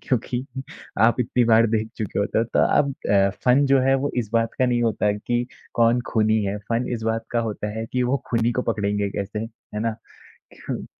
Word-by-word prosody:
क्योंकि 125 0 -1 0.6
आप 120 +2 +2
इतनी 125 0 +1
बार 115 0 +5
देख 110 0 0
चुके 105 -4 -3
होते 100 +2 0
हो। 115 - +2
तो 120 - 0 0.2
अब 140 -2 +1 0.2
अ, 100 -1 +4
फन 130 +3 +5
जो 135 -1 +4
है 135 +1 +3
वो 140 +2 0
इस 110 -4 -1
बात 115 -1 +1
का 130 - +3
नहीं 120 -1 +1
होता 110 -2 +1
है 105 0 +1
कि 120 0 0 0.3
कौन 115 +1 +3
खूनी 110 -1 +2
है? 100 +1 -2
फन 115 +4 -2
इस 115 -2 -3
बात 115 0 -1
का 120 - 0
होता 105 0 -4
है 110 - -2
कि 125 0 +1
वो 125 +3 +1
खूनी 115 0 +2
को 125 - -1
पकड़ेंगे 105 -2 -1
कैसे, 100 +2 -4
है 110 -1 -7
ना? 115 -1 -1 0.6
क्यूँ? - - -6
115 Hz, 220 wpm, -23 LUFS, 110-125 Hz, 0.6 s, बार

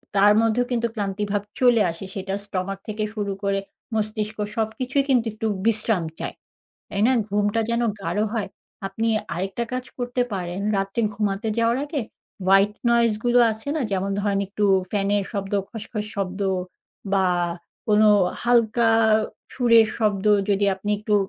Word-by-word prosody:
তার 200 +1 +6
মধ্যেও 225 +2 +2
কিন্তু 235 -1 +1
ক্লান্তিভাব 205 0 -1 0.2
চলে 245 -3 +5
আসে। 170 +3 -8
সেটা 195 0 -4
স্টোমাক 195 0 -3
থেকে 215 0 -3
শুরু 205 -2 -2
করে 200 0 +1 0.4
মস্তিষ্ক, 215 0 -2 0.2
সবকিছুই 255 +5 0
কিন্তু 245 -3 +3
একটু 220 +1 -3 0.2
বিশ্রাম 220 -4 +2 0.2
চায়। - - -4 0.5
তাই 200 - -3
না? 260 - +4 0.2
ঘুমটা 205 +2 +1
যেন 235 +1 +1 0.2
গাঢ় 210 +2 0
হয়। 205 -3 -1 0.4
আপনি 225 +4 -1 0.3
আরেকটা 190 +6 -2
কাজ 255 0 -2
করতে 245 0 0
পারেন। 180 0 -3 0.2
রাত্রে 195 +3 -1
ঘুমাতে 210 +1 -1
যাওয়ার 230 +2 +2
আগে 290 -1 -3 0.5
white 195 +2 +4
noise 235 -2 +3
গুলো 245 0 +4
আছে 220 +5 -7
না? 310 - -1
যেমন 195 +1 0
ধরেন 200 -1 0
একটু 210 +1 -1 0.3
ফ্যানের 200 -1 +1
শব্দ, 195 -1 -4 0.2
খস, 220 -1 -7
খস 210 -1 -3
শব্দ 195 0 -3 0.7
বা, 190 -1 +3 0.6
কোনো 215 0 +5 0.3
হালকা 235 -1 +3 0.6
সুরের 230 -3 +5
শব্দ 210 -3 +1 0.2
যদি 200 0 +2
আপনি 205 +2 -4
একটু 210 0 0
210 Hz, 150 wpm, -23 LUFS, 195-230 Hz, 0.7 s, তার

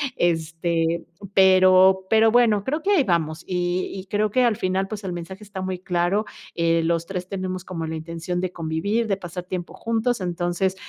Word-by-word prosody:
este, 165 0 0 0.3
pero 190 0 +6
pero 220 0 +5
bueno, 225 -4 +4
creo 300 +8 -2
que 390 - -2
ahí 335 -9 +4
vamos 165 -4 -1
y 180 0 -1
y 190 0 -7
creo 210 +1 0
que, 255 +2 +3
al 235 -3 +3
final, 190 +1 -1
pues, 210 -1 -6
el 185 - -3
mensaje 190 +4 -7
está 195 -2 -7
muy 185 0 -3
claro, 180 +4 0 0.3
eh, 165 0 +2
los 165 0 0
3 180 -1 -5
tenemos 185 -2 -4
como 170 -3 -5
la 160 0 -4
intención 170 +2 -4
de 185 - -2
convivir, 170 +8 -1
de 195 -2 0
pasar 175 -1 -7
tiempo 180 -1 -6
juntos. 230 0 -1
Entonces, 175 +1 -1
185 Hz, 185 wpm, -23 LUFS, 170-200 Hz, 0.3 s, pero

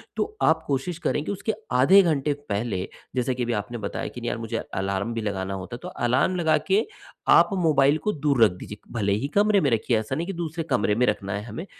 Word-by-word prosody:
तो 430 - -3
आप 160 0 +4
कोशिश 140 +5 -1
करें 150 - +1
कि - - -2
उसके 205 +2 -2 0.2
आधे 140 +11 +7
घंटे 150 -5 +1 0.2
पहले, 100 -2 -1 0.3
जैसे 130 0 0
कि 125 - -2
अभी 120 0 -1
आपने 120 +4 -6
बताया 105 -3 -4
कि 125 - -8
नहीं 120 - -2
यार - - -2
मुझे 115 0 -3
अलार्म 100 +4 -3
भी 115 - -3
लगाना 100 -2 -3
होता 95 +5 -6
है, - - -9
तो - - -5
अलार्म 130 +9 +1
लगा 160 -3 +3
के 200 +3 +3 0.5
आप - - +6
मोबाइल 155 -5 +3
को 210 - +1
दूर 140 -5 +2
रख 105 - +5
दीजिए। 105 - -8 0.2
भले 100 -4 +1
ही 110 +7 -1
कमरे 205 -1 +4
में 140 - +2
रखिए, 115 0 +1
ऐसा 110 +5 -3
नहीं 165 +4 -2
है - - -2
कि 170 - -10
दूसरे 165 -1 -3
कमरे 105 0 +2
में 125 +3 +3
रखना 100 -1 -1
है 100 +1 -3
हमें, 115 - -7
125 Hz, 245 wpm, -25 LUFS, 105-160 Hz, 0.5 s, आधे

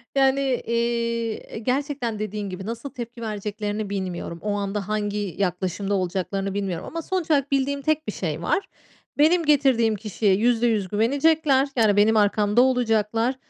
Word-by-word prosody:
yani, 270 -1 +2
iii, 235 -1 0
eee, - - -9
gerçekten 255 -2 -2
dediğin 210 -1 -4
gibi 185 +1 -7
nasıl 230 +5 -5
tepki 240 -3 -8
vereceklerini 210 -1 -3
bilmiyorum. 185 -4 -4
O 210 - -1
anda 200 -1 -3
hangi 205 -3 -2
yaklaşımda 190 +1 -1
olacaklarını 190 +1 -2
bilmiyorum 195 -4 -3
ama 330 - -4
sonuç 360 -1 -2
olarak 280 -2 +2
bildiğim 280 +1 0
tek 310 +1 0
bir 210 - -1
şey 160 -3 -3
var. 385 - 0 0.5
Benim 325 +3 +4
getirdiğim 265 -7 +3
kişiye 210 -1 0
%100 225 -2 +2
güvenecekler. 275 - +2
Yani, 220 -4 +3
benim 220 +2 +5
arkamda 210 +2 +3
olacaklar 230 -1 +1
220 Hz, 145 wpm, -24 LUFS, 205-265 Hz, 0.5 s, benim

